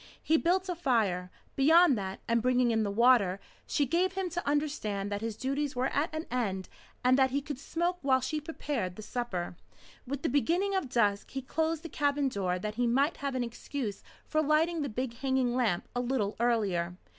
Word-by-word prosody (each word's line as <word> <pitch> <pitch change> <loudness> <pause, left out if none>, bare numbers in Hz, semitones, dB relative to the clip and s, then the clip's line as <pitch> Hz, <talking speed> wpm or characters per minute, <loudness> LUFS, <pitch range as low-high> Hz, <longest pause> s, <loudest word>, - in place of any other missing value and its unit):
He 320 - +3
built 360 +4 +2
a 360 - -1
fire. 220 - 0 0.3
Beyond 320 +2 +6
that, 190 -2 -5
and 230 0 +2
bringing 250 0 +3
in 225 -1 +2
the 210 - 0
water, 205 -3 +4 0.3
she 285 - +1
gave 355 +7 +1
him 375 -2 -2
to 350 -2 -4
understand 215 -10 -1
that 205 0 -2
his 225 -1 -4
duties 275 +2 -2
were 255 +2 +1
at 300 +4 0
an 315 +1 -4
end, 200 -7 -2 0.3
and 255 +2 +4
that 265 0 +5
he 275 +2 0
could 285 -2 -6
smoke 345 +4 -1
while 265 -2 +3
she 300 +4 -2
prepared 285 - -3
the 215 - -9
supper. 205 -9 -3 0.5
With 280 +1 -4
the - - +2
beginning 340 +9 +1
of 380 -9 -1
dusk 205 -5 +1
he 270 -1 -5
closed 320 +3 -1
the - - -5
cabin 285 -2 +1
door 185 -5 -1
that 210 +3 -4
he 245 - +3
might 275 +7 +2
have 280 -2 -3
an 255 - 0
excuse 235 -2 -5 0.2
for 310 - +1
lighting 315 +2 +2
the 285 - -2
big 235 +1 -4
hanging 260 -2 +1
lamp 220 -9 +1
a 245 - +1
little 240 -5 -1
earlier. 195 -7 +1
260 Hz, 200 wpm, -30 LUFS, 220-300 Hz, 0.5 s, Beyond